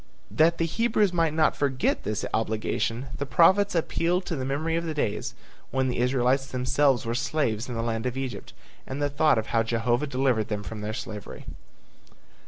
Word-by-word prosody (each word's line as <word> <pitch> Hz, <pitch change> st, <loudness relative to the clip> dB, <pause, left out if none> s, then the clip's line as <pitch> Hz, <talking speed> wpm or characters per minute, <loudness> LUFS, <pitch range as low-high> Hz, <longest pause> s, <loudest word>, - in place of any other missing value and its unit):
That 165 Hz, +2 st, +3 dB
the 165 Hz, -, +1 dB
Hebrews 215 Hz, +1 st, +1 dB
might 165 Hz, -2 st, +2 dB
not 155 Hz, -1 st, +3 dB
forget 135 Hz, -2 st, 0 dB
this 105 Hz, 0 st, -2 dB
obligation, 115 Hz, +3 st, -1 dB
the 140 Hz, -, -1 dB
prophets 185 Hz, +8 st, +4 dB
appealed 175 Hz, +2 st, 0 dB
to 165 Hz, -, -3 dB
the 130 Hz, -, -3 dB
memory 150 Hz, +5 st, -1 dB
of 170 Hz, -, 0 dB
the 160 Hz, -2 st, -4 dB
days 110 Hz, -8 st, -2 dB, 0.3 s
when 130 Hz, -1 st, 0 dB
the 125 Hz, -, -2 dB
Israelites 130 Hz, +2 st, +2 dB
themselves 130 Hz, 0 st, +1 dB
were 115 Hz, -, -1 dB
slaves 125 Hz, -3 st, -1 dB
in 120 Hz, -, -4 dB
the 115 Hz, -, -2 dB
land 115 Hz, +1 st, -2 dB
of 125 Hz, +1 st, -4 dB
Egypt 135 Hz, -2 st, -5 dB, 0.3 s
and 135 Hz, +2 st, -4 dB
the 145 Hz, 0 st, 0 dB
thought 150 Hz, -1 st, +3 dB
of 110 Hz, -, 0 dB
how 115 Hz, -, +4 dB
Jehovah 120 Hz, +4 st, 0 dB
delivered 125 Hz, -5 st, +1 dB
them 105 Hz, -2 st, -3 dB
from 110 Hz, 0 st, -7 dB
their 105 Hz, +1 st, -3 dB
slavery. 105 Hz, -4 st, -7 dB
130 Hz, 190 wpm, -26 LUFS, 115-155 Hz, 0.3 s, prophets